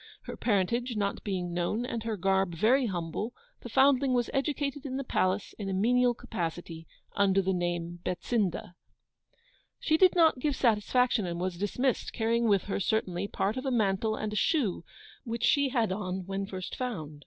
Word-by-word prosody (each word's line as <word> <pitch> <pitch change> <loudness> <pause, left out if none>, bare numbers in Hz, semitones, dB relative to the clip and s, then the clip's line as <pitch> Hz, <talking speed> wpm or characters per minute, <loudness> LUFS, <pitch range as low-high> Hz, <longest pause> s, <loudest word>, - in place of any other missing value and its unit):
Her - - -7
parentage 235 +4 0
not 200 -1 -2
being 180 -4 -3
known, 180 +7 -1
and 235 -2 -3
her 220 -1 -3
garb 190 -1 +1
very 245 - +3
humble, 185 +5 -4 0.3
the - - -8
foundling 270 -1 +4
was 240 -1 0
educated 280 +1 -1
in 265 -2 -4
the 275 - -2
Palace 190 -5 0
in 200 -2 -3
a - - -1
menial 245 +4 +3
capacity, 170 -7 -5 0.3
under 195 -1 +3
the 190 0 +1
name 175 -1 -2
of - - -31
BETSINDA. 180 0 -1 1.1
'She 315 - +2
did 370 +1 +5
not 325 -6 +4
give 290 +1 0
satisfaction, 235 -2 +2
and 170 0 -4
was 180 0 -2
dismissed, 235 +8 -1
carrying 230 0 +1
with 200 -3 +3
her, 200 - -3
certainly, 195 -2 -1
part 205 +3 -1
of 255 - -4
a - - +2
mantle 215 -2 +1
and 215 -1 -4
a - - -3
shoe, 215 - +1 0.4
which 230 0 -4
she 285 0 +3
had 235 -6 +1
on 185 -2 -3
when 195 +1 -3
first 185 -1 -6
found. 160 - -5
210 Hz, 180 wpm, -29 LUFS, 185-250 Hz, 1.1 s, did